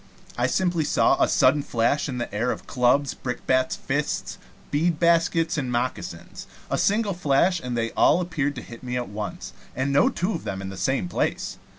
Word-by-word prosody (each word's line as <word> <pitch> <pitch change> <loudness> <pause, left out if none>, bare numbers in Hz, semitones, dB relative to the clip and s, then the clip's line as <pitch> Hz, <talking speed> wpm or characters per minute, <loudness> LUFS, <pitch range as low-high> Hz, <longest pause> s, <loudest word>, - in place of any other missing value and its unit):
I - - +1
simply 175 -4 +1
saw - - +2
a - - +5
sudden 140 +3 +4
flash 130 +4 0
in 125 - -4
the 120 - -4
air 110 +4 0
of - - -4
clubs, 130 +3 +2
brickbats, 130 +1 -1
fists, 145 +2 -3 0.3
bead 155 +2 +1
baskets, 165 -1 +2
and 130 -3 -3
moccasins 125 +1 -4 0.2
a - - +1
single 205 0 +2
flash, 170 +2 +2
and 125 -1 -3
they 115 0 -1
all - - +4
appeared 150 -5 -1
to 125 - -7
hit 115 -1 -11
me 125 -1 -3
at 120 -3 -3
once, 105 0 -6 0.2
and 135 +2 -1
no 145 - +5
two 180 +5 -2
of 165 - -4
them 95 -1 -4
in 95 0 -5
the 95 - -7
same 130 -2 0
place. 90 - -2
135 Hz, 195 wpm, -24 LUFS, 125-165 Hz, 0.3 s, a